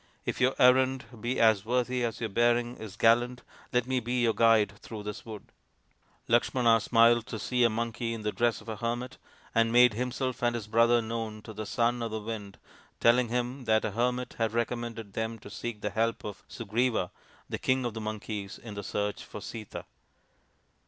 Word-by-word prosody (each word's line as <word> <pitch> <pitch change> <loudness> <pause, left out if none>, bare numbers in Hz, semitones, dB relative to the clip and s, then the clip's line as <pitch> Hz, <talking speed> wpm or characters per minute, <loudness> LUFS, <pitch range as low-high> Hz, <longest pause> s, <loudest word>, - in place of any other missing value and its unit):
" - - -38
If - - -3
your 130 +1 +3
errand 130 +1 +4 0.2
be 120 +3 -1
as 110 -3 +4
worthy 125 +1 0
as 115 -2 -2
your 115 - -2
bearing 120 +3 +2
is 110 -2 -8
gallant, 120 +2 +3 0.3
let 125 -1 +2
me 130 0 0
be 120 +1 -1
your 115 -1 +3
guide 115 -2 +4
through 110 -2 -8
this 105 +2 -7
wood." 110 -2 -9 0.8
Lakshmana 120 0 +3
smiled 115 +1 +4
to 110 - -5
see 125 +3 0
a 120 - +5
monkey 115 +1 -2
in 110 - -7
the 105 - 0
dress 120 0 0
of 110 - -17
a 110 - -4
hermit, 120 +3 -3 0.3
and 115 0 +3
made 120 -1 +6
himself 125 +2 -2
and 120 -1 +1
his 115 -3 -4
brother 115 +2 +4
known 110 -1 -4
to 110 - -9
the 110 0 -6
Son 120 +4 +1
of 115 - -2
the 110 0 -3
Wind, 105 -3 -6 0.4
telling 120 +1 +4
him 125 +2 -2
that 110 -1 +3
a - - -1
hermit 125 +3 -1
had 115 -1 0
recommended 115 -3 -3
them 110 +2 -3
to 110 - -12
seek 115 -3 -5
the 105 - -2
help 115 +2 0
of 105 -2 -7
Sugriva, 115 -2 -1 0.4
the - - -4
King 130 -1 +1
of 120 - -2
the 110 - -5
Monkeys, 105 -2 -5
in 110 -2 -9
the 100 - -5
search 105 +1 -2
for - - -9
Sita. 110 0 -7
115 Hz, 200 wpm, -29 LUFS, 110-120 Hz, 0.8 s, made